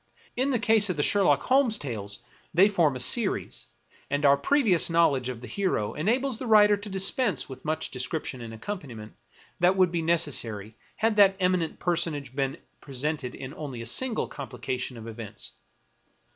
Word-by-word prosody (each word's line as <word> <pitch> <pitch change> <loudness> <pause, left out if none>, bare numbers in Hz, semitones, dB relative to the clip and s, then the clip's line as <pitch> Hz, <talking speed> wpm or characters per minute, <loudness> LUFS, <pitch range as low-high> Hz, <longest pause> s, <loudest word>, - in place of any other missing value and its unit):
In 260 +3 +1
the 260 - +2
case 220 -2 +3
of 180 - -2
the 145 - +1
Sherlock 165 -8 +3
Holmes 255 -4 +3
tales, 110 - -6 0.3
they 190 +4 +7
form 170 -9 +2
a - - -5
series, 205 - 0 0.4
and 145 +1 0
our 140 0 +6
pre 280 - +1
vious 180 -8 +4
knowledge 145 -7 +2
of 120 -2 -6
the 125 - -8
hero 185 - -1
enables 240 - 0
the 255 - -5
writer 210 -1 +6
to 205 +1 -9
dispense 195 - +1
with 130 -1 -10
much 155 +1 -2
description 130 0 -4
and 115 -1 -8
accompaniment 115 - -7 0.5
that 180 +2 +4
would 185 -2 +3
be 170 -1 -1
necessary 120 -11 0 0.2
had 220 -1 0
that 195 -1 +6
eminent 180 -3 0
personage 160 -7 -2
been 135 +1 -1 0.2
presented 140 -1 -3
in 130 +1 -8
only 140 -6 -7
a 115 - -6
single 230 - 0
complication 125 -2 -6
of 115 0 -9
events. 110 -2 -7
160 Hz, 170 wpm, -26 LUFS, 130-200 Hz, 0.5 s, they